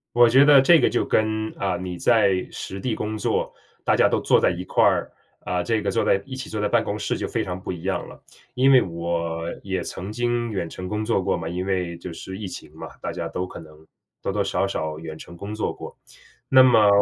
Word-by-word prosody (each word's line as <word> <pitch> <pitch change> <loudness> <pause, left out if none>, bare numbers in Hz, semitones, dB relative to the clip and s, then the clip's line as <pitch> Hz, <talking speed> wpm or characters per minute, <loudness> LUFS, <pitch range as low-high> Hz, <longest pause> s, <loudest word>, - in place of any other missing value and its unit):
我 120 0 +7
觉 135 +4 +6
得 145 -2 +8
这 165 +4 +6
个 - - +3
就 - - +1
跟， 110 0 0
啊， 95 -2 -1
你 90 0 -5
在 100 -4 +3
实 95 - -6
地 120 -1 -2
工 110 +1 -3
作， 105 - -1 0.3
大 - - +3
家 - - +4
都 - - 0
坐 - - +4
在 - - +3
一 90 +1 -4
块 - - +1
儿， - - +2 0.3
啊， 90 -1 -1
这 110 +4 0
个 100 - -3
坐 - - +1
在 95 - +3
一 130 - -7
起 130 - -7
坐 110 - -3
在 105 - +1
办 120 -1 +3
公 105 +1 -3
室 105 - -2
就 - - -3
非 - - -1
常 90 0 -5
不 - - -6
一 85 -1 -6
样 95 - -1
了。 - - -13 0.3
因 135 +1 +4
为 130 - +7
我 85 -1 -3 0.2
也 95 -2 -3
曾 95 +3 -6
经 120 0 -1
远 95 -6 -3
程 90 +2 -7
工 105 +1 -2
作 110 -4 +1
过 95 - 0
嘛， 80 -1 -5
因 90 +2 -3
为 90 -3 -2
就 85 0 -8
是 95 +3 -8
疫 105 -3 -5
情 - - -9
嘛， - - -8
大 - - -4
家 - - -4
都 90 +1 -3
可 85 - -9
能 80 0 -16 0.3
多 100 - -2
多 105 - +1
少 100 - 0
少 80 -5 -3
远 80 -1 -7
程 85 +2 -11
工 100 +4 -6
作 110 - -2
过。 - - -10 0.5
那 130 0 +7
么 115 -5 +6
95 Hz, 270 characters per minute, -23 LUFS, 90-110 Hz, 0.5 s, 得